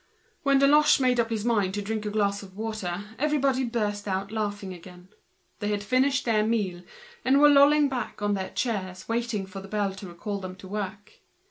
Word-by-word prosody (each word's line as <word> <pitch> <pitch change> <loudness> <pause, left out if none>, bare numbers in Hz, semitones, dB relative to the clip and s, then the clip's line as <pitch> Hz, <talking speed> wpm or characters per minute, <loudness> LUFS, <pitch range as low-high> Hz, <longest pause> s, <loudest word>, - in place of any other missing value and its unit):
When 275 -1 +3
Deloche 295 +2 +5
made 250 -2 +2
up 230 -1 +2
his 220 -1 -2
mind 205 -5 +1
to 205 - -2
drink 215 +1 -3
a - - 0
glass 200 -1 0
of 190 -1 -13
water 210 -4 -3 0.2
the 300 - +2
whole 300 0 +1
table 255 -2 -1
burst 210 -3 -2
out 195 +1 -2
laughing 205 -3 -3
again. 180 +1 -13 0.5
They 205 - -2
had 205 -1 -1
finished 260 +4 +1
and 215 -1 +2 0.9
were 295 - +8
lolling 290 +1 +6
back 255 -4 -4
on 205 0 0
their 190 -1 -3
chairs 190 -6 -3
waiting 230 -3 -1
for 190 +1 -8
the 195 - -10
bell 200 -1 -1
recalling 195 +2 -5
them 185 0 -7
to 190 0 -12
work. 205 +1 -6
210 Hz, 195 wpm, -26 LUFS, 195-240 Hz, 0.9 s, were